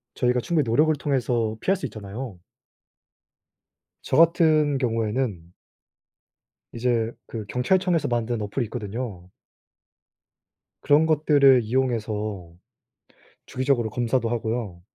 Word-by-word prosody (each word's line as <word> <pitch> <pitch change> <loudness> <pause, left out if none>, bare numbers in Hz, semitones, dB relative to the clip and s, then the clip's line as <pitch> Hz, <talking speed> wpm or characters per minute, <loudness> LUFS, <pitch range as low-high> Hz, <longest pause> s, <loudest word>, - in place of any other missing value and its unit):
저희가 125 0 +1
충분히 155 +1 0
노력을 155 +7 +3
통해서 120 -6 -1
피할 195 - +2
수 190 - -5
있잖아요. 105 0 -8 1.6
저 - - -1
같은 155 -3 +4
경우에는 110 -7 -2 1.2
이제 115 -1 0 0.2
그 110 -2 -6
경찰청에서 175 - +1
만든 120 -1 -1
어플이 105 +5 -2
있거든요. 105 -5 -6 1.5
그런 150 +2 +4
것들을 145 -4 +4
이용해서 110 -7 -2 0.9
주기적으로 130 -3 0
검사도 120 0 -1
하구요. 110 -6 -3
120 Hz, 255 characters per minute, -24 LUFS, 110-140 Hz, 1.6 s, 같은